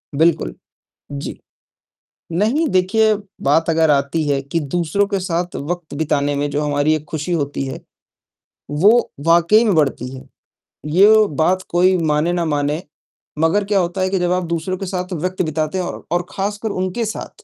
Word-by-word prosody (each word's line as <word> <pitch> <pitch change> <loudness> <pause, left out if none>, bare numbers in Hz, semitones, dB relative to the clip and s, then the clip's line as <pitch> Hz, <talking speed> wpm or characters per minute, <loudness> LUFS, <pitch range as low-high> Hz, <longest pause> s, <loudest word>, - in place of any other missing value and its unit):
बिल्कुल, 155 - +2 0.6
जी, 140 0 -6 0.9
नहीं 225 - +1
देखिए, 215 +2 +3 0.3
बात 160 +4 +2
अगर 160 -1 +3
आती 140 +3 +1
है 140 -1 +1
कि 140 +5 -2
दूसरों 170 +6 0
के 200 -2 -1
साथ 175 -1 -2
वक़्त 165 +1 -5
बिताने 145 -2 0
में 145 +1 -1
जो 145 +1 -1
हमारी 145 +1 +1
एक 155 -1 -3
खुशी 160 +3 -3
होती 145 -4 -1
है, 130 - -6 0.9
वो 205 +11 +4
वाक़ई 170 +6 +5
में 210 - +3
बढ़ती 140 -5 +1
है। 130 +1 -11 0.7
यो 210 +4 +6
बात 160 +5 +1
कोई 185 +2 +3
माने 160 +1 +1
न 175 -1 0
माने, 145 +2 0 0.6
मगर 165 +6 +2
क्या 200 0 +2
होता 180 +1 -1
है 185 - +1
कि 190 0 0
जब 175 0 0
आप 180 0 +1
दूसरों 170 +3 -2
के 195 - -5
साथ 180 0 -4
वक़्त 185 +3 -2
बिताते 155 +1 -2
हैं 185 - -1 0.3
और 175 0 0
ख़ासकर 205 +3 -3
उनके 185 +5 -2
साथ 225 - -7
170 Hz, 170 wpm, -19 LUFS, 150-190 Hz, 0.9 s, यो